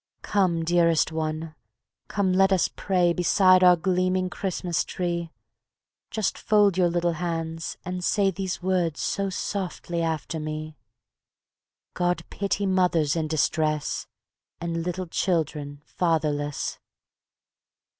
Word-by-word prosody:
Come, 175 -5 +1
dearest 170 -2 +3
one; 160 0 -3 0.5
come, 195 -3 0
let 195 +1 +4
us 190 -2 +3
pray 180 -3 +2
Beside 185 +1 +4
our 180 -1 +8
gleaming 185 +1 0
Christmas 180 -4 -1
tree; 170 -2 -3 0.8
Just 220 -3 -1
fold 205 -3 +3
your 180 -1 +3
little 175 0 +1
hands 165 -1 -3
and 180 0 -4
say 195 +1 +2
These 190 -1 -4
words 180 -4 0
so 200 0 -1
softly 180 -3 -3
after 160 0 -2
me: 155 0 -5 1.2
"God 175 -2 0
pity 200 0 -1
mothers 180 -6 +2
in 160 -2 -1
distress, 155 -1 0 0.5
And 165 0 -2
little 180 +1 -3
children 150 -5 -2
fatherless." 150 -4 -1
175 Hz, 115 wpm, -25 LUFS, 160-185 Hz, 1.2 s, our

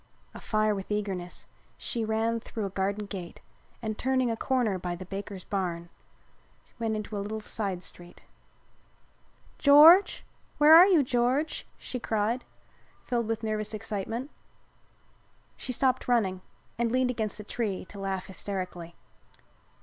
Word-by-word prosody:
Afire 215 -1 0
with 195 -2 -6
eagerness 195 -4 -3 0.3
she 235 - -3
ran 225 +1 0
through 220 -2 -5
a 195 - -4
garden 200 +2 -1
gate 190 -4 -7 0.4
and, 215 -1 -3
turning 255 -2 +1
a - - -1
corner 230 -6 0
by 175 0 -3
the 185 +2 -8
banker's 195 0 -6
barn, 175 -4 -3 0.9
went 225 -1 -1
into 215 0 -5
a - - -2
little 215 +2 -4
side 200 -4 -3
street. 175 0 -11 1.4
"George! 310 +7 +7 0.3
Where 300 +1 +7
are 345 +3 +10
you, 345 -7 +5
George?" 255 +5 0
she 250 - -6
cried, 225 +2 -1 0.6
filled 235 -2 -1
with 225 0 -2
nervous 215 0 -2
excitement. 225 +5 -4 1.2
She 255 - -5
stopped 260 +1 +1
running, 200 -7 +1 0.4
and 235 -1 +1
leaned 255 0 +2
against 220 -4 -3
a - - -6
tree 210 -3 -3
to 200 - -11
laugh 195 -1 -3
hysterically. 185 -3 -6
215 Hz, 135 wpm, -28 LUFS, 195-240 Hz, 1.4 s, are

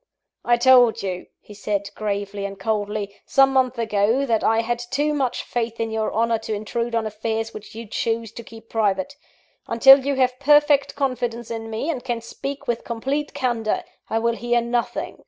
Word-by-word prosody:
"I 240 0 +3
told 245 -3 +5
you," 185 -2 -4
he 210 - -14
said, 200 0 -3
gravely 200 -1 -3
and 200 0 -5
coldly, 205 -1 -2
"some 270 -1 +4
months 255 -2 +2
ago, 225 +3 +1
that 225 -4 +1
I 225 +1 +3
had 240 +1 -2
too 275 +5 -1
much 265 -4 -1
faith 230 -1 -3
in 225 -1 -2
your 220 -1 -1
honour 230 +1 +1
to 220 -1 -4
intrude 230 +3 -3
on 225 -1 0
affairs 220 +1 -3
which 215 0 -10
you 230 +1 -7
choose 225 +1 -2
to 235 - -9
keep 225 0 -13
private. 210 +3 0 0.5
Until 270 +4 +7
you 280 +1 0
have 255 -1 +1
perfect 290 -1 +4
confidence 240 -4 -2
in 225 -1 -5
me, 225 +6 -3
and 255 -6 -5
can 240 -3 -2
speak 275 +4 -7
with 235 -1 -1
complete 270 +6 -3
candour, 230 -4 -1 0.3
I 225 - 0
will 235 +1 +1
hear 240 0 +1
nothing. 235 0 -2
230 Hz, 185 wpm, -22 LUFS, 220-255 Hz, 0.5 s, Until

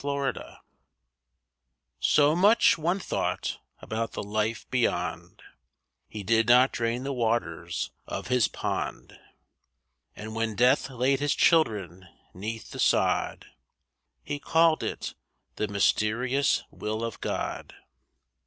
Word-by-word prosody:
TWO 140 0 -1 0.2
MEN - - -11 1.4
So 150 +1 +4
much 205 +6 +5
one 170 +3 0
thought 195 - -2 0.2
about 115 +1 -3
the - - -4
life 110 +2 -2
beyond 125 -2 -2 0.6
He 105 -2 -7
did 115 +2 +2
not 125 +2 +6
drain 115 +2 -2
the 140 +1 -3
waters 110 -9 -2 0.2
of - - -5
his 125 -5 +2
pond; - - -4 1.0
And 110 +1 -8
when 115 -1 -2
death 125 +4 +3
laid 130 +1 +1
his 145 0 +1
children 95 - +2 0.3
'neath 110 +4 -6
the - - -8
sod - - +1 0.8
He 145 0 -4
called 160 +1 +3
it—'the 105 - -6
mysterious 110 +7 +1
will 110 +1 -4
of 115 -2 -5
God. - - -4
115 Hz, 115 wpm, -27 LUFS, 110-140 Hz, 1.4 s, not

